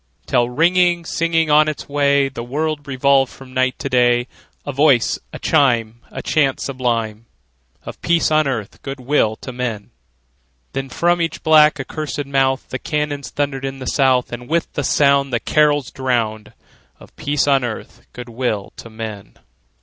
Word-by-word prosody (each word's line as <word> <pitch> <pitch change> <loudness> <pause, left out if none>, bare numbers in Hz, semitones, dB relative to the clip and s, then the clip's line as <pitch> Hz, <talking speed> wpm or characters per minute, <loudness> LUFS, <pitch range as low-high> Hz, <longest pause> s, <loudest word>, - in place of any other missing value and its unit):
Till, 120 0 +1
ringing, 175 +4 +2
singing 165 -2 0
on 150 +1 +5
its 155 - -4
way, 140 -1 +2
The 135 -3 -7
world 145 +4 -3
revolved 135 0 +2
from 130 -1 -14
night 130 0 +1
to - - -4
day, 120 -1 +3 0.4
A 145 - -3
voice, 140 -4 +3
a - - -7
chime, 120 -4 +1
A - - -7
chant 140 -4 +1
sublime 115 -4 -2 0.6
Of - - -9
peace 170 -1 +2
on 155 -1 +3
earth, 110 -7 -4
good 135 0 -6
will 125 -4 +1
to 130 - -9
men! 120 -4 -4 0.8
Then 135 0 -4
from 175 +5 +1
each 165 - -3
black, 155 -1 +5
accursed 145 +1 -4
mouth 135 -1 0
The 130 - -4
cannon 150 -2 -2
thundered 140 -1 -3
in 135 0 -4
the 130 - -8
South, 130 -2 +2
And 120 +2 -7
with 165 +1 -1
the 145 - -2
sound 140 0 +3
The 120 - 0
carols 145 -2 +2
drowned 115 -5 -2 0.5
Of - - -17
peace 145 -1 0
on 135 -2 +3
earth, 120 -3 -7
good 125 0 -9
will 115 -4 -3
to 115 - -10
men! 110 -3 -8
135 Hz, 165 wpm, -19 LUFS, 120-150 Hz, 0.8 s, on